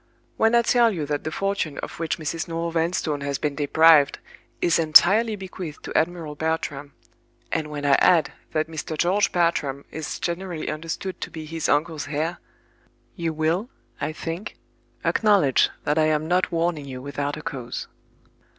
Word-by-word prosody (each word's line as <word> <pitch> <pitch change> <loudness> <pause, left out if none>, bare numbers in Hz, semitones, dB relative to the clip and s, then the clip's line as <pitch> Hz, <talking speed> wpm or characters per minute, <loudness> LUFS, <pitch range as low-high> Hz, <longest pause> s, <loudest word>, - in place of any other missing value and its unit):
When 225 +1 +3
I 235 - +5
tell 235 0 +4
you 165 -7 -3
that 145 0 -3
the 155 - -2
fortune 195 -6 -2
of - - -6
which 165 -2 -1
Mrs. 160 +1 -3
Noel 165 0 -3
Vanstone 165 -3 -1
has 140 -1 -2
been 150 -1 -1
deprived 150 0 +5 0.4
is 170 -1 +2
entirely 195 +8 +6
bequeathed 185 -5 -8
to - - -7
Admiral 165 -2 0
Bartram; 150 -2 -3 0.6
and 155 - -1
when 145 -1 -5
I 140 - +4
add 170 -4 +4 0.2
that 155 0 0
Mr. 160 0 -5
George 190 +6 +2
Bartram 150 -6 0
is 160 -1 -5
generally 175 -1 -3
understood 165 +4 -5
to - - -4
be 160 -1 -8
his 165 0 -3
uncle's 150 -1 0
heir—you 165 +2 -6
will, 160 +8 0 0.3
I - - -1
think, 165 +5 -6 0.5
acknowledge 200 - +4
that 150 +1 +1
I 155 - +4
am 155 0 +1
not 180 +2 +1
warning 165 -3 0
you 130 -2 -7
without 145 +2 -3
a 155 - -8
cause. 125 -5 -5
160 Hz, 160 wpm, -24 LUFS, 150-175 Hz, 0.6 s, entirely